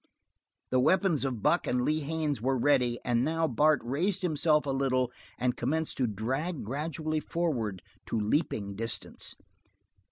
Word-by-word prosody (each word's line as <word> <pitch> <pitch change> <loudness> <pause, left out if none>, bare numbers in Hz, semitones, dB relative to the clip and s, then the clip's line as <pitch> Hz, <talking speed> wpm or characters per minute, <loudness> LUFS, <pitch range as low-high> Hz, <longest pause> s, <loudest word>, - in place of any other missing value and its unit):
The 130 - +3
weapons 170 +1 +3
of 125 -5 -3
Buck 170 +4 +3
and 125 0 +1
Lee 155 +1 +2
Haines 150 -4 -2
were 130 +2 +1
ready, 125 -2 +3
and 120 -1 +2
now 160 +3 +1
Bart 150 +3 +3
raised 175 - 0
himself 155 -2 +2
a 140 - -1
little 130 -2 +1 0.3
and 125 0 0
commenced 155 +6 -1
to 130 - +2
drag 130 - -2
gradually 155 +5 -2
forward 120 - -2 0.2
to 115 - -1
leaping 105 -3 -1
distance. 115 +1 -2
135 Hz, 150 wpm, -29 LUFS, 120-155 Hz, 0.3 s, The